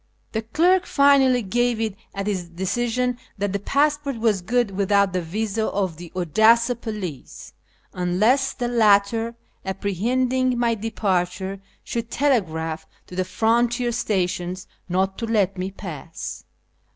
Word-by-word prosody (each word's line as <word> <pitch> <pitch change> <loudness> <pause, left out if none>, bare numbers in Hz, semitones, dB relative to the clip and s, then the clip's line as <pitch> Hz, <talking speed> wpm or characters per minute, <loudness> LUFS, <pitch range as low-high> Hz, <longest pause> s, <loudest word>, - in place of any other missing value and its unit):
The 220 - -1
clerk 345 +11 +2
finally 270 -3 +4
gave 240 +3 +1
it 220 -3 -1 0.2
as 195 0 -3
his 185 -4 -2
decision 240 +7 -1 0.2
that 200 -1 -1
the 200 - 0
passport 285 +3 +1
was 220 -4 +1
good 240 +2 +1
without 200 0 +2
the 180 - 0
visa 215 +5 -2
of 185 -5 -2
the 175 0 -10
Odessa 220 - +4
police, 210 - -7 0.4
unless 210 +10 +2
the 245 -2 -2
latter, 225 0 +3 0.3
apprehending 245 +7 0
my 235 -1 +2
departure, 195 -3 -2 0.2
should 230 -1 -4
telegraph 165 - 0 0.2
to 180 - -11
the 185 - +1
frontier 235 +5 +1
stations 185 -5 -1 0.2
not 190 +2 0
to 230 - -3
let 200 -4 +1
me 185 0 -3
pass. 165 -5 -7
215 Hz, 130 wpm, -23 LUFS, 185-240 Hz, 0.4 s, finally